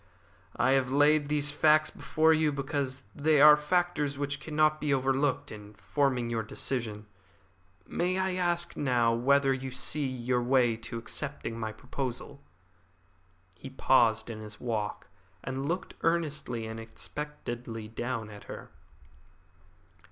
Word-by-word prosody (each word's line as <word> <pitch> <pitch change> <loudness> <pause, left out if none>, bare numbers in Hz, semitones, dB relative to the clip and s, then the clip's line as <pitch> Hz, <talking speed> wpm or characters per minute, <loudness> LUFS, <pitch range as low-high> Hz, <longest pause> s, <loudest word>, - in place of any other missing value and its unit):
I 130 - +2
have 135 -1 +2
laid 145 +1 +4
these 145 -1 +1
facts 155 +1 +4
before 160 +1 +2
you 155 -1 +2
because 140 -1 -3
they 150 0 +2
are 150 +1 +10
factors 150 -2 0
which 140 0 -3
cannot 155 0 +1
be 150 - 0
overlooked 135 +1 +1
in 105 0 -11
forming 120 +6 0
your 115 -1 -1
decision. 110 -1 -3 0.8
May 180 - -1
I 190 0 0
ask 175 -1 0
now 120 -4 +2
whether 135 +3 +3
you 130 0 -4
see 135 +2 0
your 125 -1 -1
way 120 -2 +3
to 115 +1 -6
accepting 115 -1 -5
my 110 -1 -3
proposal?" 130 +4 -6 1.1
He 130 - -9
paused 115 -4 +3
in 110 - -7
his 105 -1 -8
walk, 110 -4 -3 0.4
and 135 +2 -3
looked 175 +4 -3
earnestly 150 -8 0
and 110 0 -6
expectantly 120 -2 -6
down 115 -1 -4
at 105 -1 -12
her. - - -9
135 Hz, 135 wpm, -29 LUFS, 115-150 Hz, 1.1 s, are